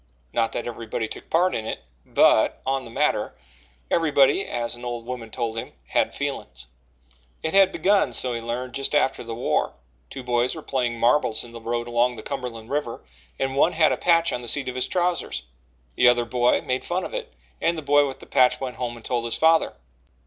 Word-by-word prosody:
Not 115 -1 +1
that - - -3
everybody 115 -1 -4
took - - -9
part 180 +3 +3
in 110 -1 -3
it - - -5 0.2
but, - - +4
on 135 0 -1
the - - -10
matter, 115 - 0 0.6
everybody, 145 -5 +3
as 120 -1 -2
an 120 0 -10
old 120 -1 -4
woman 120 -2 -6
told 115 -1 -3
him, 115 - -5 0.2
"had - - +1
feelin's." 65 -1 -5 0.8
It 160 - -2
had 195 -1 +6
begun, 200 +1 +2
so 125 -1 0
he 115 - -3
learned, 120 +2 -4
just 135 +3 0
after 135 -3 +2
the 115 -1 -6
war. 120 - 0 0.4
Two 135 - -7
boys 120 +2 +1
were 160 - -8
playing 125 -3 -1
marbles 120 -2 +2
in 120 - -12
the 115 0 -9
road 120 +1 -2
along 120 +1 +2
the 110 - -9
Cumberland 120 -3 -6
River, 145 -5 -3 0.3
and 135 0 -1
one 155 +5 +3
had 160 -1 +4
a - - +2
patch 170 -1 +3
on 125 - -3
the 120 - -8
seat 135 +3 0
of - - -5
his 130 0 -1
trousers. 180 - -1 0.5
The 125 - +4
other 120 -1 +4
boy 120 +1 +2
made 130 0 -2
fun 180 +2 -2
of - - -6
it - - -5 0.3
and 170 0 +1
the 155 - -5
boy 145 0 +4
with 135 - -7
the - - -11
patch 125 -1 +3
went 130 -2 -5
home 120 -1 -3
and 115 - -13
told 120 -2 -1
his 115 - 0
father. 160 0 +4
125 Hz, 215 wpm, -24 LUFS, 120-145 Hz, 0.8 s, had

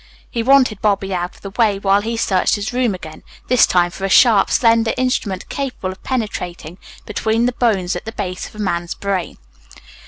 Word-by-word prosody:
He 235 - -1
wanted 255 -4 +3
Bobby 200 -2 0
out 175 0 -3
of - - -20
the 195 - -7
way 210 -2 +2
while 195 0 +2
he 230 +2 -3
searched 190 -4 +1
his 205 +2 -4
room 245 -5 +1
again, 155 -3 -10 0.3
this 250 -1 +5
time 175 -1 +2
for 195 - -9
a 195 - 0
sharp, 215 0 +5
slender 230 -1 +3
instrument 215 -7 -1
capable 255 -9 -4
of 190 - -12
penetrating 180 - -4 0.3
between 220 +2 0
the 250 - +2
bones 200 -7 0
at - - -6
the 225 - -5
base 185 -4 -5
of - - -16
a 210 -1 -3
man's 175 -1 -2
brain. 195 -3 -3
205 Hz, 195 wpm, -18 LUFS, 185-230 Hz, 0.3 s, this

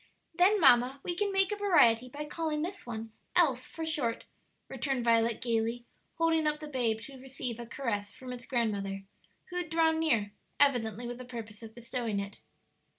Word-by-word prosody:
"Then, 375 +5 +4
mamma, 260 -2 +5
we 350 - -1
can 405 +2 0
make 390 0 +2
a - - 0
variety 255 - +4
by 290 +4 -6
calling 305 0 -2
this 380 -4 -6
one 225 -1 -5 0.2
Else 275 -8 +4
for 325 - -6
short," 275 -8 0 0.4
returned 270 -4 -2
Violet, 230 -1 +3
gayly, 230 0 -1 0.3
holding 325 -1 +2
up 300 0 0
the 305 - -7
babe 235 -6 0
to 265 +1 -10
receive 255 -3 -5
a 235 - -7
caress 210 -5 -3
from 255 +1 -8
its 245 0 -8
grandmother, 200 -5 -1 0.5
who 355 - -4
had 350 -3 -3
drawn 320 0 +3
near, 230 -11 +1 0.3
evidently 245 -5 +2
with 240 +1 -6
the - - -6
purpose 225 -4 -8
of 220 -1 -11
bestowing 235 -3 -3
it. 200 0 -7
250 Hz, 180 wpm, -31 LUFS, 230-315 Hz, 0.5 s, mamma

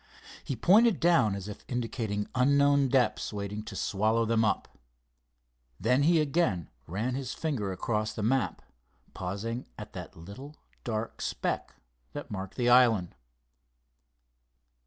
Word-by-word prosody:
He 135 - -3
pointed 205 - +5
down 165 - +4
as 100 0 -6
if 105 - -8
indicating 115 -4 -2
unknown 140 +2 +4
depths 125 -5 +1
waiting 105 0 -4
to 110 -3 -7
swallow 110 +4 +1
them 115 0 +2
up. 105 - -1 1.0
Then 125 +2 +3
he 165 +3 +4
again 140 - 0 0.2
ran 105 +10 -2
his 130 -1 -4
finger 130 -12 -2
across 105 +2 -1
the 105 0 -5
map, 130 +4 0 0.5
pausing 100 +6 -4
at - - -9
that - - -8
little 120 - -10 0.3
dark 110 -1 -3
speck - - -2 0.4
that - - -7
marked 95 -2 -5
the 120 -2 0
island. 120 -7 +5
115 Hz, 130 wpm, -29 LUFS, 105-135 Hz, 1.0 s, pointed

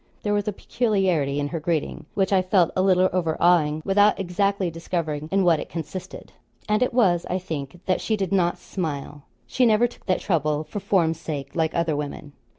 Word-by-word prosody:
There 205 - 0
was 205 0 0
a - - +1
peculiarity 190 - 0
in 145 - -1
her 165 - -3
greeting, 155 -1 -2
which 195 0 +1
I 190 - +5
felt 185 -2 +2
a 185 - +2
little 185 -1 +4
overawing, 165 -3 +2
without 205 +2 +4
exactly 195 0 0
discovering 160 -2 -3
in 195 0 +3
what 170 -3 +4
it - - -7
consisted; 165 +2 -7 0.4
and 210 +2 +1
it 250 - +2
was 190 -8 +3
I 185 - 0
think 160 -3 -6
that 185 - 0
she 220 - 0
did 195 -3 -2
not 180 -2 +2
smile. 145 -5 -5 0.2
She 255 - 0
never 230 0 +4
took 240 - -8
that 185 - +2
trouble 155 -4 0
for 205 - -6
form's 175 -5 +1
sake, 145 -4 -6
like 160 -2 0
other 170 -3 +1
women. 145 0 -6
175 Hz, 195 wpm, -24 LUFS, 155-195 Hz, 0.4 s, I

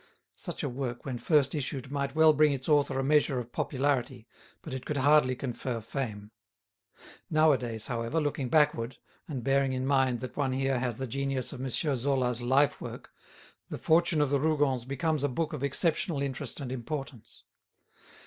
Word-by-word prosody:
Such - - -6
a - - 0
work 125 -1 -4
when 130 -3 -4
first 145 -2 +2
issued 135 -2 -3
might 140 0 -2
well 160 0 +6
bring 150 0 +4
its 135 -1 -5
author 145 -3 +3
a 135 - 0
measure 145 -1 +3
of 120 -1 -5
popularity, 130 -3 -1 0.4
but 155 - -7
it 130 -1 -5
could 150 - -3
hardly 140 -1 +4
confer 125 -1 -4
fame. 110 -3 -5 1.0
Nowadays, 130 -8 +2
however, 120 +5 -1
looking 145 -4 -2
backward, 130 -5 +2 0.3
and 135 -6 -5
bearing 135 +1 +2
in 130 0 -2
mind 135 -3 +2
that 130 - -6
one 135 -3 0
here 135 -1 0
has 120 -2 -2
the 130 - -3
genius 135 +1 -2
of 130 - -7
M. 135 - -2
Zola's 130 -3 0
lifework, 135 +3 0 0.6
"The - - -4
Fortune 165 -1 +3
of 145 -2 +1
the 140 - +3
Rougons" 145 -5 +1
becomes 145 +2 -1
a 145 - +2
book 155 +5 -2
of 150 - -4
exceptional 155 +2 0
interest 135 +2 -4
and 135 -3 -5
importance. 130 -1 -6
135 Hz, 170 wpm, -29 LUFS, 125-145 Hz, 1.0 s, well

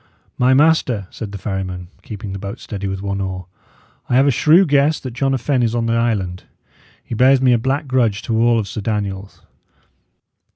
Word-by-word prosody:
"My 130 +1 +3
master," 140 -8 +2
said 110 -3 -7
the 100 - -6
ferryman, 95 -3 -5
keeping 100 -2 -7
the 95 - -6
boat 100 +1 -7
steady 100 -1 -6
with 95 0 -4
one 100 0 -2
oar, 95 -1 -4 0.6
"I 125 - +1
have 135 +2 +5
a 140 - +4
shrew 160 +9 +5
guess 145 0 +2
that 130 - -7
John 135 +2 0
a - - 0
Fenne 130 +1 0
is 115 -1 0
on 115 -1 0
the 115 - 0
island. 105 -6 -1 0.6
He - - -8
bears 130 +4 +4
me 130 -1 +3
a 120 - +2
black 135 +5 -1
grudge 120 -6 +1
to 115 - -2
all 115 -1 +3
Sir 105 +2 -6
Daniel's. 100 -2 -4
115 Hz, 200 wpm, -19 LUFS, 100-130 Hz, 0.6 s, have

